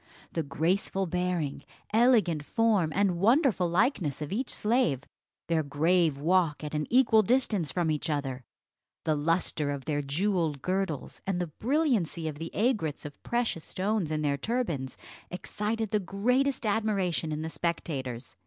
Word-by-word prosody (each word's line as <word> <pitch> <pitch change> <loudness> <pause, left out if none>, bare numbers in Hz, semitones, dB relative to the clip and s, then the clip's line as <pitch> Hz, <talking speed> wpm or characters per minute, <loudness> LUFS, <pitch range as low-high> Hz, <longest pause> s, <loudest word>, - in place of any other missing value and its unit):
The 165 - 0
graceful 175 +6 0
bearing, 180 -5 -2 0.3
elegant 220 - +4
form, 210 -3 +2
and 195 -3 +2
wonderful 225 - +3
likeness 180 - +1
of 150 -2 -5
each 245 +6 -2
slave; 210 - +1 0.4
their 165 -1 +1
grave 155 +1 +2
walk 165 -1 +2
at 150 - -5
an 150 0 -1
equal 230 -3 +5
distance 210 - +1
from 165 +1 0
each 150 +1 -2
other, 135 -4 -2 0.6
the 155 - +1
lustre 155 -1 +1
of 140 -2 -4
their 145 -1 0
jewelled 160 -1 -1
girdles, 185 -6 -2
and 190 -2 0
the 175 - 0
brilliancy 230 - +1
of 150 -1 -5
the 165 +1 -4
aigrettes 205 - 0
of 145 - -9
precious 235 -9 -1
stones 195 -3 -1
in 155 -1 -1
their 140 -1 +1
turbans, 170 - -2 0.3
excited 210 +4 -3
the 210 - +2
greatest 250 +8 0
admiration 200 -7 0
in 155 +1 -3
the 160 - -3
spectators. 140 -6 -3
175 Hz, 150 wpm, -29 LUFS, 150-215 Hz, 0.6 s, equal